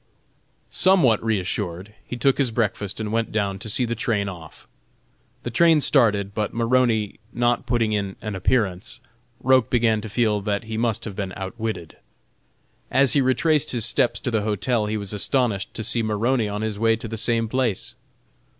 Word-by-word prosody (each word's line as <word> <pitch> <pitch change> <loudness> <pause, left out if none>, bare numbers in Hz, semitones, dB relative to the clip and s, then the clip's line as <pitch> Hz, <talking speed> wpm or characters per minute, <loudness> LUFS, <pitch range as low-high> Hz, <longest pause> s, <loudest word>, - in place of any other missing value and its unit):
Somewhat 170 - +4
reassured, 100 -2 -2
he 125 - -7
took 135 +3 +2
his 135 -3 +2
breakfast 105 -3 -2
and 105 -1 -3
went 115 0 -1
down 100 -3 -1
to 110 +2 -6
see 125 +4 +1
the 120 - -2
train 110 -3 -1
off. 85 -5 -10 0.8
The 120 - -4
train 165 +5 +5
started, 105 -9 +3
but 105 +1 -3
Maroney 115 -3 +1
not 120 +1 0
putting 115 -3 +1
in 100 -2 -2
an 105 -1 -5
appearance, 95 -1 -1 0.4
Roch 130 -2 +3
began 115 -3 +2
to 110 - -7
feel 105 -1 +1
that 100 +2 -2
he 110 0 -6
must 115 -1 -1
have 105 -4 -6
been 95 -2 -4
outwitted. 95 -3 -5 0.9
As 135 0 +4
he 145 - +4
retraced 150 +3 +2
his 115 -3 +1
steps 120 +2 +2
to 125 - -2
the 110 -2 +1
hotel 105 +2 0
he 110 +1 -2
was 100 -1 -3
astonished 105 -2 0
to 110 - -4
see 115 +1 0
Maroney 110 +2 0
on 105 +1 -3
his 110 -2 -3
way 115 0 +3
to 115 +1 -7
the 115 - -5
same 115 +1 0
place. 120 -4 -1
110 Hz, 175 wpm, -23 LUFS, 105-120 Hz, 0.9 s, train